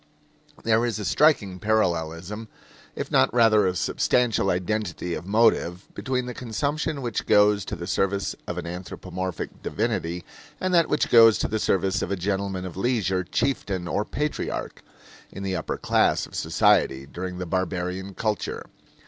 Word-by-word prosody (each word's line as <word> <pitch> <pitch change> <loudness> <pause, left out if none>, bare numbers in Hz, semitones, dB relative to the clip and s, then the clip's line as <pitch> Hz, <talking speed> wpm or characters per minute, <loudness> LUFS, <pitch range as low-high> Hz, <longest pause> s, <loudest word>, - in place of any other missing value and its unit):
There 115 0 +3
is 120 -2 -1
a 105 - -4
striking 100 - +3
parallelism, 90 0 -1 0.5
if - - -5
not 65 - +4
rather 110 -4 +4
a 90 - -1
substantial 115 +2 +1
identity 90 -1 -2
of 85 +3 -5
motive, 100 -4 +2
between 130 -2 -2
the 125 - -5
consumption 140 +5 -2
which 120 -3 -3
goes 105 -1 +4
to - - -4
the - - -6
service 100 0 0
of - - -4
an - - -4
anthropomorphic 90 0 -6
divinity 85 +2 -2 0.4
and 185 0 -1
that 170 -2 +4
which 150 - 0
goes 115 -2 +8
to - - 0
the 110 - -2
service 95 -1 +1
of - - -2
a 100 - 0
gentleman 95 0 -2
of 90 - -7
leisure 95 -4 0
chieftain 100 -5 -1
or 105 - 0
patriarch 150 +7 -3 0.5
in 100 - -7
the 95 -1 -1
upper 80 - -3
class - - +2
of - - -17
society 80 -6 +2
during 90 +5 -6
the 90 - -4
barbarian 95 +1 -3
culture. 110 -2 -2
100 Hz, 155 wpm, -25 LUFS, 90-115 Hz, 0.5 s, goes